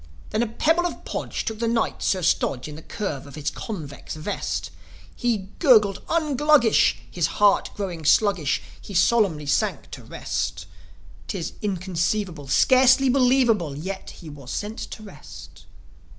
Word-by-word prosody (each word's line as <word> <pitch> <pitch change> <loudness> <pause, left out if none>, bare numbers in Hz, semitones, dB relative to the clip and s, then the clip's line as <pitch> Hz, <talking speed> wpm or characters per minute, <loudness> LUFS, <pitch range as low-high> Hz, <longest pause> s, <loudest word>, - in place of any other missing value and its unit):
Then 215 - +1
a 240 - +1
pebble 320 +10 +1
of - - -9
Podge - - -4
took 220 -1 -4
the 230 - 0
Knight, 230 0 0
Sir 185 -2 0
Stodge, 135 -4 +1
In 150 - -8
the 155 - -10
curve 155 -8 -5
of 140 - -11
his 150 -1 -3
convex 155 -12 -7
vest. 155 +7 -3 0.4
He 220 -6 -1
gurgled 215 - +5
"Un 315 -4 0
Gluggish!" 295 -5 +4
His 170 -2 0
heart 205 -1 +4
growing 180 -5 -4
sluggish, 175 -4 +2 0.2
He 200 - -9
solemnly 180 -6 +3
sank 145 - -1
to - - -9
rest. 85 0 -4 0.6
'Tis 160 - -4
inconceivable, 185 -4 -2
Scarcely 260 - +5
believable, 245 - +3
Yet, 190 +5 -6
he 165 - -11
was 145 -4 -10
sent 210 - -4
to 215 - -7
rest. 210 - -12
200 Hz, 150 wpm, -24 LUFS, 160-235 Hz, 0.6 s, gurgled